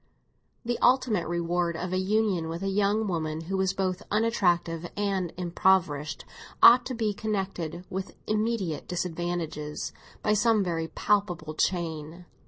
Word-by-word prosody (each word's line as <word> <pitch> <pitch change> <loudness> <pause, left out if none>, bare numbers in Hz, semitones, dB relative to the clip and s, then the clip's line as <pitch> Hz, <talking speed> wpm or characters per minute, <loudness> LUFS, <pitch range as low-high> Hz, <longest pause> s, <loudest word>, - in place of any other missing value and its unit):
The 240 0 -1
ultimate 245 -9 +3
reward 170 0 0
of 180 +1 -4
a 185 - +1
union 190 -4 +1
with 165 +3 -4
a 195 - 0
young 205 +2 +1
woman 160 -3 -2
who 180 +4 -4
was 190 0 +1
both 185 -1 -1
unattractive 175 -6 +1
and 195 -4 0
impoverished 170 -4 +1 0.4
ought 245 +1 +9
to 255 - -4
be 220 -2 0
connected 190 -5 -3
with 190 +1 -5
immediate 215 -7 -1
disadvantages 170 -3 -3 0.3
by 210 - +3
some 215 0 +3
very 165 -3 -2
palpable 175 -3 0
chain. 165 0 -2
185 Hz, 135 wpm, -27 LUFS, 165-205 Hz, 0.4 s, ought